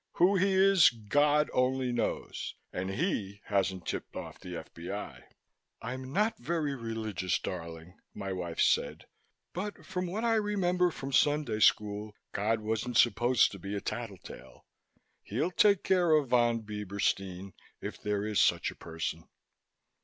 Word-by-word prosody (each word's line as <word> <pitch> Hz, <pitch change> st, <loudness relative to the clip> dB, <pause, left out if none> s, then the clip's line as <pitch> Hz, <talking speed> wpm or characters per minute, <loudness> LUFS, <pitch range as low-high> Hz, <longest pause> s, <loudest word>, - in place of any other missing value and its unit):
Who 185 Hz, +3 st, +4 dB
he 190 Hz, +1 st, +3 dB
is 190 Hz, -2 st, +7 dB
God 145 Hz, +7 st, +2 dB
only 130 Hz, 0 st, +1 dB
knows 120 Hz, -2 st, -3 dB, 0.2 s
and 95 Hz, +1 st, -3 dB
He 100 Hz, -, -2 dB
hasn't 95 Hz, -3 st, 0 dB
tipped -, -, -5 dB
off -, -, -7 dB
the 90 Hz, -1 st, -7 dB
F.B.I." 85 Hz, +5 st, -7 dB, 0.5 s
"I'm 130 Hz, +3 st, -6 dB
not 210 Hz, +8 st, +1 dB
very 150 Hz, +1 st, -1 dB
religious, 110 Hz, -6 st, -2 dB
darling," 85 Hz, 0 st, -7 dB, 0.2 s
my 100 Hz, -2 st, -4 dB
wife 85 Hz, -2 st, -5 dB
said, -, -, +2 dB, 0.5 s
"but 200 Hz, +3 st, -5 dB
from 185 Hz, -1 st, -3 dB
what 205 Hz, +6 st, -3 dB
I 230 Hz, -1 st, +3 dB
remember 180 Hz, -4 st, +1 dB
from 135 Hz, -4 st, -6 dB
Sunday 145 Hz, -6 st, +2 dB
School, 105 Hz, 0 st, +2 dB, 0.2 s
God 110 Hz, +2 st, 0 dB
wasn't 110 Hz, +2 st, -1 dB
supposed 120 Hz, 0 st, +4 dB
to 100 Hz, -, -9 dB
be 100 Hz, +3 st, -5 dB
a -, -, -1 dB
tattle 115 Hz, -2 st, -5 dB
tale. -, -, -13 dB, 0.6 s
He'll 130 Hz, -, -2 dB
take 200 Hz, 0 st, +4 dB
care 180 Hz, -4 st, +3 dB
of 145 Hz, -4 st, +1 dB
Von 120 Hz, -2 st, +3 dB
Bieberstein, 100 Hz, -2 st, -2 dB, 0.3 s
if -, -, -7 dB
there 105 Hz, -1 st, -1 dB
is 105 Hz, -1 st, +2 dB
such -, -, +2 dB
a -, -, -14 dB
person." 80 Hz, 0 st, -5 dB
115 Hz, 145 wpm, -30 LUFS, 100-155 Hz, 0.6 s, is